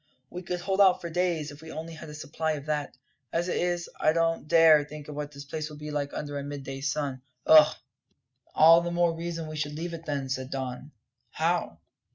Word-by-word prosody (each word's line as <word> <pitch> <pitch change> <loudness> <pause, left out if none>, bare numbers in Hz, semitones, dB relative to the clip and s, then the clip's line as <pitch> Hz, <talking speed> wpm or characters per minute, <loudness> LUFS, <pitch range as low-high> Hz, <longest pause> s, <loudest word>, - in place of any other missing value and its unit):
"We 180 - -6
could 180 0 -4
hold 195 +2 +1
out 190 -2 +6
for 170 - -6
days, 170 -3 0
if 145 +1 -13
we 160 - -10
only 160 +1 -6
had 155 -1 -10
a 150 - -8
supply 155 +1 -2
of 145 -2 -6
that. 150 -4 -3 0.3
As 170 +2 0
it - - 0
is, 175 0 -1
I 155 - +3
don't 165 -2 0
dare 160 -2 +6
think 150 0 -10
what 150 0 -5
this 140 0 -10
place 155 +2 -4
will 150 - -10
be 150 0 -7
like 145 -1 -2
under 145 -1 -4
a - - -5
midday 135 -1 -6
sun 140 -1 -2 0.2
ugh!" 155 -1 +7 0.8
"All 165 +2 +8
the 175 - -3
more 170 -1 +2
reason 165 -1 -5
we 155 - -7
should 150 -1 -3
leave 170 +2 -4
it, 165 0 -8
then," 140 -2 -2
said 130 0 -3
Don. 130 +1 -5 0.4
"How?" 165 - -1
155 Hz, 215 wpm, -28 LUFS, 145-165 Hz, 0.8 s, All